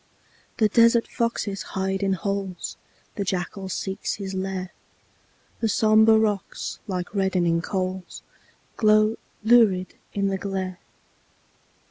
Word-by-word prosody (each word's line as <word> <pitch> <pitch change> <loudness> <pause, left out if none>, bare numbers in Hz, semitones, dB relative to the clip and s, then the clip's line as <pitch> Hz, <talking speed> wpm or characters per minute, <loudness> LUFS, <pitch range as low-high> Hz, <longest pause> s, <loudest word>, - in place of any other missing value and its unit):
The 220 - +4
desert 230 +2 +4
foxes 230 -4 -2 0.2
hide 190 +1 -1
in 195 -1 +1
holes, 195 0 -3 0.4
The 200 - 0
jackal 190 +1 -3
seeks 190 +1 -3
his 195 -2 -6
lair; 190 -1 -3 0.9
The 225 - 0
sombre 220 +2 +5
rocks, 210 -3 -1
like 180 -2 -4
reddening 180 -4 +1
coals, 185 0 -4 0.5
Glow 215 0 +4 0.3
lurid 215 -5 +4 0.2
in 200 -1 0
the 195 -1 -2
glare. 190 -2 -4
195 Hz, 110 wpm, -24 LUFS, 185-215 Hz, 0.9 s, sombre